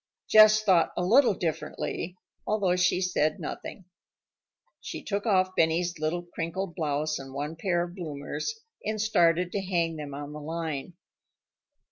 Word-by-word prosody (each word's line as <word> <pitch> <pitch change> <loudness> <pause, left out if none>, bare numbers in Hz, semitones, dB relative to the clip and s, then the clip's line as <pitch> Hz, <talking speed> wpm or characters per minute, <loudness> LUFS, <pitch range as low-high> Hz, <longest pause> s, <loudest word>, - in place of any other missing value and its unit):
Jess 215 0 +7
thought 185 -5 +3
a 180 - 0
little 235 +1 +5
differently, 170 +1 -3 0.3
although 200 -4 +2
she 180 0 +2
said 155 -4 +1
nothing. 190 - -7 0.9
She - - -7
took 205 +2 -2
off 185 -2 +2
Benny's 170 +1 +1
little 160 +3 -1
crinkled 175 +2 -4
blouse 150 -1 -1
and 135 0 -9
one 145 +3 -3
pair 175 +1 0
of 175 0 -7
bloomers, 170 - -5 0.2
and 215 0 -2
started 175 -4 +3
to 200 - -1
hang 170 -4 -1
them 145 -2 -6
on 145 +1 -7
the 150 - -7
line. 160 0 -4
175 Hz, 145 wpm, -28 LUFS, 155-190 Hz, 0.9 s, Jess